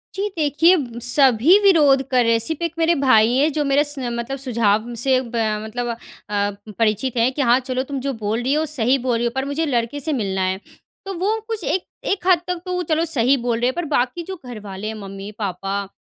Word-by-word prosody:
जी। 400 Hz, +2 st, -1 dB
देखिए, 325 Hz, +4 st, +4 dB, 0.2 s
सभी 260 Hz, -, +5 dB
विरोध 295 Hz, -9 st, +5 dB
कर 250 Hz, -2 st, +3 dB
रहे 230 Hz, -, +2 dB
हैं 230 Hz, -, +3 dB
सिर्फ़ 320 Hz, +8 st, -2 dB
एक 335 Hz, -1 st, -2 dB
मेरे 330 Hz, +1 st, +3 dB
भाई 225 Hz, -2 st, +5 dB
हैं 300 Hz, +3 st, +3 dB
जो 300 Hz, -, 0 dB
मेरे 280 Hz, +1 st, +3 dB
स 290 Hz, -2 st, -3 dB
मतलब 240 Hz, +2 st, -3 dB
सुझाव 235 Hz, -3 st, 0 dB
से 260 Hz, -1 st, +3 dB
ब 240 Hz, -1 st, -8 dB, 0.3 s
मतलब 240 Hz, +3 st, -4 dB, 0.4 s
अ, 205 Hz, 0 st, 0 dB, 0.3 s
परिचित 225 Hz, +3 st, 0 dB
हैं 235 Hz, +3 st, +3 dB
कि 290 Hz, -, -2 dB
हाँ 245 Hz, 0 st, +4 dB
चलो 255 Hz, 0 st, -3 dB
तुम 275 Hz, 0 st, -5 dB
जो 275 Hz, +1 st, -3 dB
बोल 220 Hz, 0 st, -2 dB
रही 260 Hz, +4 st, 0 dB
हो 310 Hz, +1 st, +1 dB
सही 265 Hz, -3 st, +1 dB
बोल 250 Hz, -2 st, -1 dB
रही 235 Hz, -, -1 dB
हो, 235 Hz, -, 0 dB
पर 265 Hz, +1 st, -1 dB
मुझे 295 Hz, +3 st, -1 dB
लड़के 245 Hz, 0 st, -1 dB
से 305 Hz, +3 st, -2 dB
मिलना 195 Hz, -7 st, -1 dB
है। 185 Hz, +1 st, -1 dB, 0.5 s
तो 390 Hz, -, -4 dB
वो 425 Hz, +4 st, 0 dB
कुछ 445 Hz, -4 st, -4 dB
एक 370 Hz, -, -1 dB, 0.2 s
एक 380 Hz, -2 st, -1 dB
हद 360 Hz, -3 st, +5 dB
तक 360 Hz, -1 st, -3 dB
तो 360 Hz, 0 st, -2 dB
चलो 325 Hz, 0 st, 0 dB
सही 270 Hz, -3 st, +2 dB
बोल 235 Hz, -1 st, -1 dB
रहे 245 Hz, -, +1 dB
हैं 260 Hz, -, 0 dB
पर 345 Hz, -, -2 dB
बाकी 255 Hz, +8 st, 0 dB
जो 380 Hz, +2 st, -6 dB
घर 240 Hz, -3 st, -7 dB
वाले 200 Hz, 0 st, -7 dB
हैं 220 Hz, -, -3 dB
मम्मी-पापा, 195 Hz, -1 st, -5 dB
255 Hz, 230 wpm, -21 LUFS, 230-305 Hz, 0.5 s, सभी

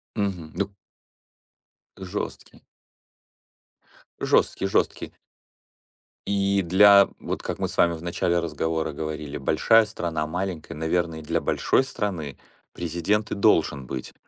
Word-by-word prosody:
Мгм. 95 Hz, -7 st, -3 dB
Ну 100 Hz, 0 st, -3 dB, 1.2 s
Жесткий. 95 Hz, +2 st, -6 dB, 1.6 s
Жесткий, 95 Hz, -, +2 dB
жесткий. 95 Hz, -, 0 dB, 1.1 s
И 100 Hz, -1 st, +1 dB
для, 100 Hz, +3 st, +7 dB
вот -, -, -4 dB
как -, -, -4 dB
мы -, -, 0 dB
с -, -, -9 dB
вами 85 Hz, 0 st, +4 dB
в 80 Hz, -, -7 dB
начале 85 Hz, 0 st, 0 dB
разговора 80 Hz, -1 st, -2 dB
говорили, 75 Hz, -1 st, -5 dB
большая 115 Hz, -1 st, +4 dB
страна, 85 Hz, -7 st, -3 dB
маленькая, 85 Hz, 0 st, -4 dB
наверное 80 Hz, +1 st, -1 dB
для 75 Hz, -, -1 dB
большой 135 Hz, -, +1 dB
страны 90 Hz, -, -4 dB, 0.4 s
президент 85 Hz, +5 st, -1 dB
и -, -, -1 dB
должен 80 Hz, -9 st, +2 dB
быть 65 Hz, 0 st, -6 dB
85 Hz, 115 wpm, -25 LUFS, 80-100 Hz, 1.6 s, для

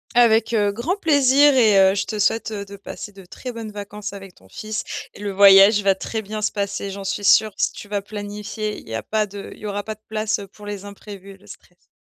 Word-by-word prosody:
Avec, 230 Hz, -1 st, +4 dB
heu, 205 Hz, -2 st, +2 dB
grand 250 Hz, -, -2 dB
plaisir, 285 Hz, -4 st, +4 dB
et 220 Hz, -6 st, +5 dB
heu, 195 Hz, -, -3 dB
je 200 Hz, -, -1 dB
te 215 Hz, -, -5 dB
souhaite, 220 Hz, +2 st, +1 dB
heu, 205 Hz, -2 st, -4 dB
de 200 Hz, 0 st, -11 dB
passer 205 Hz, +1 st, -9 dB
de 195 Hz, -1 st, -13 dB
très 250 Hz, +7 st, -8 dB
bonnes 225 Hz, -2 st, -7 dB
vacances 205 Hz, 0 st, -7 dB
avec 195 Hz, -2 st, -11 dB
ton 95 Hz, -, -21 dB
fils 215 Hz, -, -5 dB, 0.3 s
et -, -, -14 dB
le 205 Hz, -1 st, -3 dB
voyage 200 Hz, +1 st, +7 dB
va 195 Hz, -1 st, +3 dB
très 220 Hz, +3 st, -4 dB
bien 215 Hz, +1 st, -6 dB
se 210 Hz, -, 0 dB
passer, 200 Hz, -1 st, -3 dB
j'en 195 Hz, 0 st, -7 dB
suis 200 Hz, +2 st, -3 dB
sûre. 215 Hz, +2 st, +5 dB
Si -, -, +1 dB
tu 205 Hz, -, -10 dB
vas 205 Hz, -1 st, -1 dB
planifier, 210 Hz, +1 st, -5 dB
il -, -, -17 dB
y 115 Hz, -, -5 dB
a 115 Hz, -, -4 dB
pas 215 Hz, -1 st, 0 dB
de 200 Hz, 0 st, -9 dB
il -, -, -18 dB
y -, -, -9 dB
aura 205 Hz, 0 st, -3 dB
pas 215 Hz, -1 st, -6 dB
de 215 Hz, -, -38 dB
place, 215 Hz, 0 st, -1 dB
heu, 200 Hz, -, -8 dB
pour 205 Hz, +2 st, -15 dB
les 205 Hz, -1 st, -6 dB
imprévus 200 Hz, -1 st, -11 dB
et 195 Hz, -, -14 dB
le 200 Hz, -, -22 dB
stress. 175 Hz, 0 st, -16 dB
205 Hz, 260 wpm, -21 LUFS, 200-220 Hz, 0.3 s, voyage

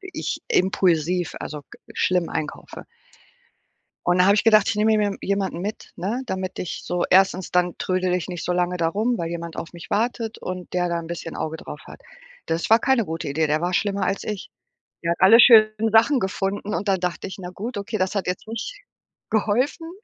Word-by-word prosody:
ich 380 Hz, -1 st, -5 dB
impulsiv, 180 Hz, -2 st, +1 dB
also, 150 Hz, 0 st, -6 dB
g -, -, -14 dB, 0.2 s
schlimm 180 Hz, -2 st, +1 dB
einkaufe. 155 Hz, -, -5 dB, 1.2 s
Und 175 Hz, +1 st, +3 dB
da 180 Hz, -, +6 dB
habe 200 Hz, +2 st, +5 dB
ich 210 Hz, -, +1 dB
gedacht, 215 Hz, -3 st, +5 dB
ich -, -, 0 dB
nehme 215 Hz, +1 st, +3 dB
mir 210 Hz, -1 st, +1 dB
je 195 Hz, -, -7 dB
jemanden 195 Hz, -3 st, -1 dB
mit, 205 Hz, +4 st, -6 dB
ne, 210 Hz, +9 st, -2 dB
damit 185 Hz, -3 st, -4 dB
ich 180 Hz, -, -5 dB
so 175 Hz, 0 st, -1 dB
1. 190 Hz, -1 st, +3 dB
dann 180 Hz, -1 st, +1 dB
trödele 185 Hz, -1 st, 0 dB
ich 180 Hz, -, -4 dB
nicht 175 Hz, -2 st, -5 dB
so 180 Hz, -, 0 dB
lange 180 Hz, 0 st, 0 dB
da 165 Hz, -2 st, +1 dB
rum, 220 Hz, +7 st, 0 dB
weil 165 Hz, -1 st, -2 dB
jemand 170 Hz, -1 st, -6 dB
auf 165 Hz, -, -6 dB
mich 170 Hz, -2 st, -11 dB
wartet 230 Hz, 0 st, -1 dB
und 185 Hz, -1 st, -6 dB
der 180 Hz, -1 st, 0 dB
da 170 Hz, 0 st, -1 dB
'n 165 Hz, -, -6 dB
bisschen 170 Hz, -1 st, -6 dB
Auge 160 Hz, 0 st, -4 dB
drauf 150 Hz, -, -9 dB
hat. -, -, -12 dB, 0.5 s
Das 165 Hz, +5 st, -2 dB
war 225 Hz, -, +8 dB
keine 265 Hz, -2 st, +2 dB
gute 165 Hz, -3 st, -4 dB
Idee, 155 Hz, +3 st, +1 dB
der 155 Hz, +1 st, +1 dB
war 175 Hz, +2 st, -1 dB
schlimmer 200 Hz, +1 st, 0 dB
als 195 Hz, -, -2 dB
ich. 210 Hz, -2 st, -5 dB, 0.5 s
Der 170 Hz, -, +1 dB
hat 170 Hz, -, -1 dB
alle 220 Hz, +5 st, +7 dB
schönen 220 Hz, -2 st, +6 dB
Sachen 230 Hz, +5 st, +5 dB
gefunden 195 Hz, 0 st, -2 dB
und 205 Hz, -, -3 dB
dann 190 Hz, -2 st, +2 dB
dachte 180 Hz, +2 st, -3 dB
ich: 190 Hz, -, -8 dB
„Na 180 Hz, -1 st, -6 dB
gut, 215 Hz, +5 st, -6 dB
okay, 200 Hz, +2 st, -3 dB
das 185 Hz, +1 st, 0 dB
hat 195 Hz, -, -1 dB
jetzt 180 Hz, +4 st, -3 dB
nicht 230 Hz, -, -6 dB, 0.5 s
geholfen.“ 250 Hz, -, 0 dB
190 Hz, 215 wpm, -23 LUFS, 175-215 Hz, 1.2 s, war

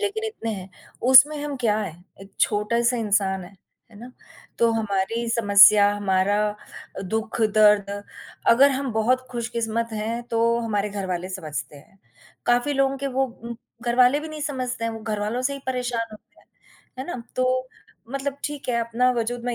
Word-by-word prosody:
लेकिन 425 Hz, +2 st, -2 dB
इतने 230 Hz, -, -5 dB
हैं, 190 Hz, -1 st, -9 dB, 0.3 s
उसमें 265 Hz, +4 st, +7 dB
हम 290 Hz, -2 st, -4 dB
क्या 210 Hz, 0 st, +2 dB
है, 200 Hz, -7 st, -4 dB, 0.3 s
एक 195 Hz, -, -14 dB
छोटा-सा 235 Hz, +4 st, +1 dB
इंसान 195 Hz, -4 st, 0 dB
हैं, 195 Hz, +2 st, -15 dB, 0.3 s
है 205 Hz, -, -15 dB
ना? 250 Hz, +2 st, -11 dB, 0.5 s
तो 235 Hz, -1 st, +4 dB
हमारी 225 Hz, +2 st, -1 dB
समस्या, 205 Hz, -2 st, +6 dB
हमारा 200 Hz, 0 st, +1 dB, 0.6 s
अ, -, -, -4 dB
दुःख-दर्द 215 Hz, 0 st, +2 dB, 0.6 s
अगर 275 Hz, +4 st, +6 dB
हम 265 Hz, -2 st, -2 dB
बहुत 240 Hz, +4 st, +2 dB
खुशकिस्मत 230 Hz, -1 st, -2 dB
हैं 225 Hz, +3 st, -3 dB
तो 230 Hz, +1 st, +2 dB
हमारे 210 Hz, -2 st, -1 dB
घरवाले 185 Hz, -3 st, -4 dB
समझते 155 Hz, -5 st, -6 dB
हैं, 190 Hz, +7 st, -19 dB, 0.5 s
काफ़ी 245 Hz, +4 st, +2 dB
लोगों 275 Hz, 0 st, +1 dB
के 280 Hz, -, -3 dB
वो 270 Hz, -, +4 dB
उम, 235 Hz, -1 st, -9 dB, 0.3 s
घरवाले 250 Hz, +3 st, +4 dB
भी 315 Hz, -, -7 dB
नहीं 310 Hz, -1 st, -8 dB
समझते 255 Hz, -5 st, -3 dB
हैं, 230 Hz, -, -1 dB
वो 225 Hz, -, -7 dB
घरवालों 215 Hz, +2 st, -2 dB
से 280 Hz, +2 st, 0 dB
ही -, -, -6 dB
परेशान 245 Hz, -2 st, -2 dB
होते 210 Hz, -, -17 dB
हैं, -, -, -26 dB, 0.5 s
है 260 Hz, -, -5 dB
ना? 255 Hz, -9 st, -5 dB
तो 255 Hz, 0 st, 0 dB, 0.4 s
मतलब 275 Hz, 0 st, -3 dB
ठीक 290 Hz, -3 st, -5 dB
है 240 Hz, -, +1 dB
अपना 230 Hz, +2 st, +1 dB
वज़ूद 240 Hz, 0 st, -3 dB
मैं 245 Hz, -1 st, -1 dB
230 Hz, 170 wpm, -23 LUFS, 210-255 Hz, 0.6 s, उसमें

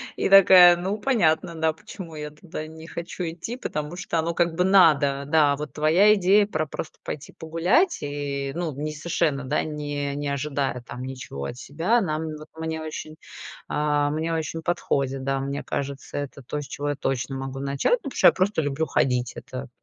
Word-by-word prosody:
и -, -, 0 dB
такая: 180 Hz, -2 st, +9 dB
"Ну, 190 Hz, +4 st, -2 dB
понятно, 170 Hz, -10 st, +1 dB
да, 160 Hz, 0 st, +1 dB
почему 175 Hz, -2 st, -10 dB
я 150 Hz, 0 st, -5 dB
туда 155 Hz, 0 st, -8 dB
не 160 Hz, +1 st, -11 dB
хочу 170 Hz, +2 st, -6 dB
идти", 175 Hz, +8 st, -5 dB
потому 150 Hz, -9 st, -4 dB
что 170 Hz, -, -2 dB
оно, 165 Hz, +1 st, -1 dB
как 170 Hz, -1 st, +1 dB
бы, 180 Hz, -, +2 dB
надо, 150 Hz, -7 st, +4 dB
да. 150 Hz, -2 st, +4 dB
Вот 150 Hz, +1 st, -6 dB
твоя 170 Hz, +8 st, +5 dB
идея 200 Hz, +1 st, +4 dB
про 155 Hz, -6 st, -2 dB
просто 155 Hz, -, -7 dB
пойти 145 Hz, -, -6 dB
погулять 175 Hz, -, +2 dB
и 145 Hz, -1 st, -3 dB
ну, 170 Hz, -2 st, -2 dB
не 150 Hz, +3 st, -4 dB
совершенно, 150 Hz, -2 st, -1 dB
да, 135 Hz, +4 st, 0 dB
не 145 Hz, -2 st, -3 dB
не 145 Hz, 0 st, -3 dB
ожидая 140 Hz, -2 st, -2 dB
там 125 Hz, +1 st, -8 dB
ничего 125 Hz, -, -6 dB
от 120 Hz, -, -6 dB
себя, 165 Hz, -, +1 dB
нам 160 Hz, -3 st, -2 dB
вот 155 Hz, -, -11 dB
мне 160 Hz, 0 st, -3 dB
очень, 155 Hz, 0 st, -6 dB, 0.5 s
а, 145 Hz, -1 st, +1 dB
мне 160 Hz, +2 st, -1 dB
очень 160 Hz, 0 st, -3 dB
подходит, 140 Hz, -6 st, -1 dB
да, 135 Hz, 0 st, 0 dB
мне 140 Hz, +1 st, -3 dB
кажется, 140 Hz, 0 st, -4 dB
это 140 Hz, -1 st, -5 dB
то, 145 Hz, +4 st, -4 dB
с 140 Hz, -, -9 dB
чего 145 Hz, +1 st, -4 dB
я 145 Hz, -, -1 dB
точно 135 Hz, 0 st, -2 dB
могу 135 Hz, 0 st, -5 dB
начать. 140 Hz, -, 0 dB
Ну -, -, +5 dB
потому -, -, -13 dB
что -, -, +7 dB
я -, -, +9 dB
просто 190 Hz, -2 st, +1 dB
люблю 145 Hz, +1 st, -1 dB
ходить. 125 Hz, -3 st, 0 dB
Это 65 Hz, 0 st, -7 dB
155 Hz, 195 wpm, -25 LUFS, 140-170 Hz, 0.5 s, такая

